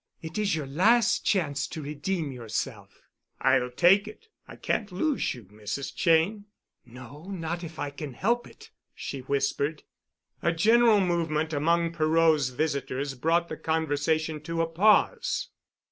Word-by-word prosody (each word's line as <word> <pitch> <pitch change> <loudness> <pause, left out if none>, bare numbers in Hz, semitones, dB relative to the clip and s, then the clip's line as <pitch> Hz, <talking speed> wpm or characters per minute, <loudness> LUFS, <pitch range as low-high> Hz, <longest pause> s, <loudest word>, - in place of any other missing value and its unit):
It 160 +5 -6
is 200 -5 +1
your 155 -3 -3
last 205 - +3
chance 155 -9 +1
to 155 - -7
redeem 150 +2 -3
yourself." 115 -4 -5 0.4
"I'll 125 - +2
take 180 - +4
it. 445 - -12 0.2
I - - -10
can't 210 -4 -2
lose 275 - -1
you, 120 - -11
Mrs. 105 +7 -6
Cheyne." 180 +5 +2 0.4
"No—not 160 +8 -7
if 165 -1 -8
I 145 - -3
can 145 -2 -7
help 235 - 0
it," - - -16 0.2
she 140 - -6
whispered. 140 +3 -1 0.6
A 170 - +1
general 220 +4 +5
movement 160 -3 0
among 170 +3 +1
Perot's 155 -3 +3
visitors 140 0 -2
brought 165 +6 +1
the 155 - -6
conversation 160 0 -1
to 165 +2 -2
a - - +1
pause. 210 - +2
160 Hz, 140 wpm, -27 LUFS, 140-180 Hz, 0.6 s, general